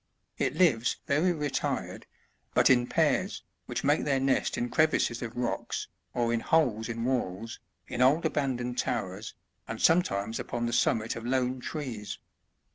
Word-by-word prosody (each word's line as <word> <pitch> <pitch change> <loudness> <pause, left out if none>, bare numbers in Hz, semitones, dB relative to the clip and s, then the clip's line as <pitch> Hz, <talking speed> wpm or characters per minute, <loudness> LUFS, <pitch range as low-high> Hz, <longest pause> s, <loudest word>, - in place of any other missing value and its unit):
It - - 0
lives 125 -10 +3
very 155 +6 +2
retired, 150 -4 -2 0.5
but - - +6
in 125 -1 +4
pairs, - - +1 0.2
which - - -3
make 145 +2 +3
their 140 -2 +1
nest 135 0 +1
in 120 - 0
crevices 155 -6 +2
of 120 -1 -6
rocks, 120 -1 -2 0.3
or 120 -1 +1
in 115 - +1
holes 115 -6 +1
in 115 0 -3
walls, 115 -4 -2 0.3
in 120 - -3
old 145 +6 +4
abandoned 125 -5 -1
towers, 110 -4 -3 0.3
and - - -5
some 165 +2 +5
times 100 - -3
upon 120 0 -3
the 120 - -2
summit 115 -2 +1
of 115 - -6
lone 130 +1 0
trees. 125 -7 -5
125 Hz, 155 wpm, -29 LUFS, 115-140 Hz, 0.5 s, but